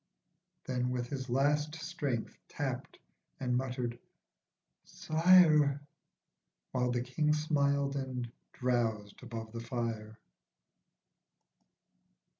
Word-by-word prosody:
Then, 125 Hz, -1 st, -1 dB
with 125 Hz, -1 st, -2 dB
his 130 Hz, -3 st, -4 dB
last 150 Hz, +4 st, +2 dB
strength 155 Hz, -8 st, -3 dB
tapped, -, -, -4 dB, 0.4 s
and 125 Hz, -2 st, 0 dB
muttered, 125 Hz, -2 st, -2 dB, 0.8 s
"Sire." 155 Hz, -4 st, +5 dB, 0.9 s
While 125 Hz, -1 st, +1 dB
the 120 Hz, 0 st, 0 dB
King 150 Hz, +4 st, +1 dB
smiled 140 Hz, -2 st, +1 dB
and 130 Hz, -3 st, -3 dB, 0.2 s
drowsed 115 Hz, -5 st, -1 dB
above 115 Hz, -3 st, -7 dB
the 115 Hz, -, -5 dB
fire. 115 Hz, -2 st, -4 dB
130 Hz, 85 wpm, -32 LUFS, 120-145 Hz, 0.9 s, Sire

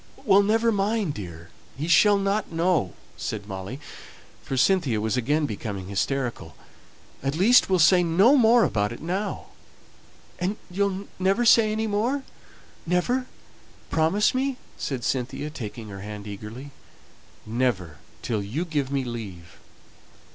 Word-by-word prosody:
"Well, 200 Hz, -1 st, +6 dB
never 225 Hz, +3 st, +2 dB
mind, 205 Hz, -4 st, 0 dB
dear; 85 Hz, -, -9 dB, 0.3 s
he 150 Hz, +4 st, -3 dB
shall 205 Hz, +5 st, +5 dB
not 200 Hz, 0 st, -1 dB
know," 165 Hz, -, +1 dB, 0.2 s
said 105 Hz, -2 st, -4 dB
Molly, 95 Hz, +6 st, -6 dB, 0.6 s
for 135 Hz, -, -4 dB
Cynthia 140 Hz, -, +2 dB
was 110 Hz, +2 st, -1 dB
again 145 Hz, +5 st, +1 dB
becoming 100 Hz, -5 st, -5 dB
hysterical, 115 Hz, -, -2 dB, 0.7 s
"at 135 Hz, +2 st, -1 dB
least, 215 Hz, +9 st, +5 dB
we'll 190 Hz, -, +3 dB
say 180 Hz, +2 st, +6 dB
no 185 Hz, -, +5 dB
more 235 Hz, -2 st, +5 dB
about 105 Hz, -, 0 dB
it 120 Hz, -, -7 dB
now." 190 Hz, +6 st, -3 dB, 0.9 s
"And 190 Hz, +4 st, -1 dB
you'll 200 Hz, +1 st, -1 dB
never 195 Hz, +6 st, +2 dB
say 225 Hz, -1 st, +6 dB
any 220 Hz, +1 st, -1 dB
more 230 Hz, +7 st, 0 dB, 0.6 s
never 245 Hz, +9 st, +1 dB, 0.6 s
promise 165 Hz, +7 st, +2 dB
me," 265 Hz, 0 st, -1 dB, 0.2 s
said 130 Hz, -4 st, -4 dB
Cynthia, 130 Hz, +4 st, -2 dB
taking 115 Hz, -4 st, -7 dB
her 100 Hz, -1 st, -8 dB
hand 105 Hz, 0 st, -7 dB
eagerly. 105 Hz, +7 st, -8 dB, 0.7 s
"Never 110 Hz, -, -1 dB, 0.2 s
till 110 Hz, -4 st, -1 dB
you 120 Hz, -, -3 dB
give 145 Hz, -5 st, -2 dB
me 140 Hz, -1 st, 0 dB
leave. 100 Hz, -9 st, -8 dB
155 Hz, 135 wpm, -25 LUFS, -, 0.9 s, Well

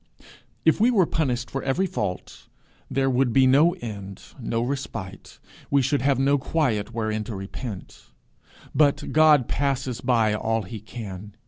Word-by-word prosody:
If 160 Hz, -, +4 dB
we 235 Hz, -, +5 dB
were 205 Hz, -8 st, +4 dB
punished 125 Hz, -7 st, -1 dB
for 135 Hz, -, -3 dB
every 140 Hz, +8 st, 0 dB
fault, 90 Hz, -, -5 dB, 0.4 s
there 135 Hz, 0 st, +1 dB
would 130 Hz, -1 st, +2 dB
be 135 Hz, +2 st, +5 dB
no 145 Hz, +7 st, +5 dB
end, 100 Hz, -4 st, -7 dB, 0.2 s
no 115 Hz, -1 st, -1 dB
respite; 120 Hz, -7 st, -6 dB, 0.3 s
we 140 Hz, -1 st, +3 dB
should 135 Hz, +2 st, +1 dB
have 135 Hz, 0 st, +2 dB
no 140 Hz, +2 st, +2 dB
quiet 130 Hz, -8 st, -1 dB
wherein 110 Hz, -2 st, -2 dB
to 110 Hz, -, -6 dB
repent; 95 Hz, +1 st, -8 dB, 0.7 s
but 145 Hz, -2 st, +2 dB
God 155 Hz, -5 st, +5 dB
passes 135 Hz, -3 st, -1 dB
by 115 Hz, -4 st, +2 dB
all 110 Hz, +1 st, -1 dB
he 105 Hz, +4 st, -7 dB
can. 105 Hz, -2 st, -9 dB
125 Hz, 150 wpm, -24 LUFS, 110-140 Hz, 0.7 s, we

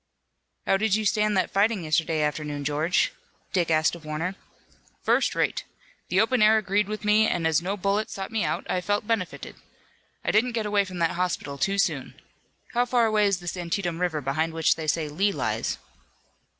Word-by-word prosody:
"How 195 Hz, -, +3 dB
did 215 Hz, 0 st, +2 dB
you 215 Hz, 0 st, -1 dB
stand 210 Hz, 0 st, +2 dB
that 185 Hz, -, +1 dB
fighting 205 Hz, -1 st, +2 dB
yesterday 155 Hz, 0 st, +1 dB
afternoon, 150 Hz, -1 st, -2 dB
George?" 150 Hz, +5 st, +1 dB, 0.4 s
Dick 175 Hz, -3 st, +1 dB
asked 155 Hz, 0 st, +3 dB
of 170 Hz, -2 st, -9 dB
Warner. 155 Hz, +4 st, -3 dB, 0.7 s
"First -, -, +2 dB
rate. -, -, 0 dB, 0.5 s
The 185 Hz, -, +2 dB
open 225 Hz, +3 st, +2 dB
air 215 Hz, +1 st, +6 dB
agreed 205 Hz, -1 st, +1 dB
with 215 Hz, 0 st, -5 dB
me, 215 Hz, +1 st, +4 dB
and 170 Hz, -2 st, -1 dB
as 160 Hz, -1 st, +3 dB
no 195 Hz, +4 st, -2 dB
bullet 200 Hz, +3 st, 0 dB
sought 195 Hz, +2 st, -6 dB
me 225 Hz, -1 st, 0 dB
out -, -, -2 dB
I 180 Hz, -, 0 dB
felt 205 Hz, +4 st, -1 dB
benefited. 215 Hz, -5 st, -3 dB, 0.7 s
I -, -, +2 dB
didn't 235 Hz, +3 st, +2 dB
get 225 Hz, -2 st, -1 dB
away 205 Hz, -1 st, +2 dB
from 185 Hz, -1 st, -8 dB
that 165 Hz, -1 st, +1 dB
hospital 175 Hz, -6 st, -2 dB
too 195 Hz, +6 st, +1 dB
soon. 195 Hz, -, -1 dB, 0.6 s
How 240 Hz, 0 st, +3 dB
far 245 Hz, -1 st, +2 dB
away 215 Hz, -2 st, +3 dB
is 195 Hz, -3 st, 0 dB
this 175 Hz, +1 st, -4 dB
Antietam 175 Hz, -1 st, -2 dB
River, 165 Hz, -4 st, 0 dB
behind 155 Hz, +5 st, -1 dB
which 160 Hz, -1 st, +3 dB
they 160 Hz, -1 st, -6 dB
say 155 Hz, +1 st, 0 dB
Lee 190 Hz, +8 st, +1 dB
lies?" -, -, -2 dB
185 Hz, 190 wpm, -26 LUFS, 160-210 Hz, 0.7 s, air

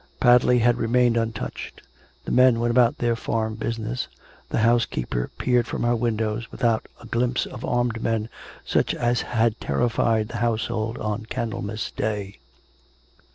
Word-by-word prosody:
Padley 125 Hz, 0 st, +5 dB
had 120 Hz, 0 st, +3 dB
remained 120 Hz, +1 st, +3 dB
untouched; 115 Hz, -1 st, -4 dB, 0.4 s
the -, -, -4 dB
men 125 Hz, -2 st, +5 dB
went 120 Hz, 0 st, +1 dB
about 120 Hz, -1 st, +4 dB
their 120 Hz, -1 st, +1 dB
farm 110 Hz, -1 st, -2 dB
busi 115 Hz, +1 st, -3 dB
ness; 115 Hz, +3 st, -3 dB, 0.4 s
the -, -, -1 dB
housekeeper 110 Hz, -, +1 dB
peered 125 Hz, -2 st, +2 dB
from -, -, -3 dB
her 120 Hz, 0 st, +2 dB
windows, 115 Hz, -1 st, -1 dB
without 115 Hz, -2 st, 0 dB
a -, -, -11 dB
glimpse 120 Hz, +1 st, 0 dB
of -, -, -9 dB
armed 120 Hz, -2 st, 0 dB
men 115 Hz, -1 st, 0 dB, 0.4 s
such -, -, +1 dB
as 120 Hz, 0 st, +1 dB
had 115 Hz, -1 st, 0 dB
terrified 110 Hz, -, +1 dB
the 115 Hz, -, -5 dB
household 115 Hz, -1 st, -1 dB
on 105 Hz, +1 st, -3 dB
Candlemas 110 Hz, -2 st, -3 dB
day. 105 Hz, -2 st, -3 dB
115 Hz, 150 wpm, -24 LUFS, 110-120 Hz, 0.4 s, Padley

